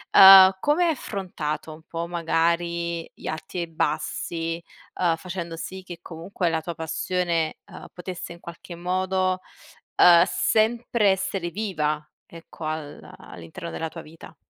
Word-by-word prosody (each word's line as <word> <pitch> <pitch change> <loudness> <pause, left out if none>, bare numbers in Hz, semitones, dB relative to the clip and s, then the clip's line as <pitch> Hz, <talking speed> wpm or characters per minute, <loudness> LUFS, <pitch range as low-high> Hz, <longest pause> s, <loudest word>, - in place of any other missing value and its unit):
uhm, 190 -1 +10
come 300 - +2
hai 335 - +3
affrontato, 165 - -4
un 155 - -13
po', 165 0 -4
magari 170 0 -1
gli - - -14
arti 155 +3 -5
e 175 - 0
i 170 - -3
bassi, 165 +1 -2 0.3
ehm, 170 -2 +1
facendo 170 -1 -6
sì 190 +3 -7
che 175 -2 -9
comunque 170 +2 -3
la 160 -1 0
tua 170 +1 -6
passione, 165 0 -1
uhm, - - -10
potesse 180 -1 -7
in 170 - -10
qualche 170 +1 -10
modo, 185 +1 0 0.6
uhm, 170 -1 +8
sempre 225 0 +1
essere 190 -2 -1
viva, 155 -7 -2 0.2
ecco 165 -1 -11
al 155 -1 -4 0.2
all'interno 85 - -9
della 165 - -3
tua 165 - -9
vita? 160 +1 -14
170 Hz, 145 wpm, -24 LUFS, 165-185 Hz, 0.6 s, uhm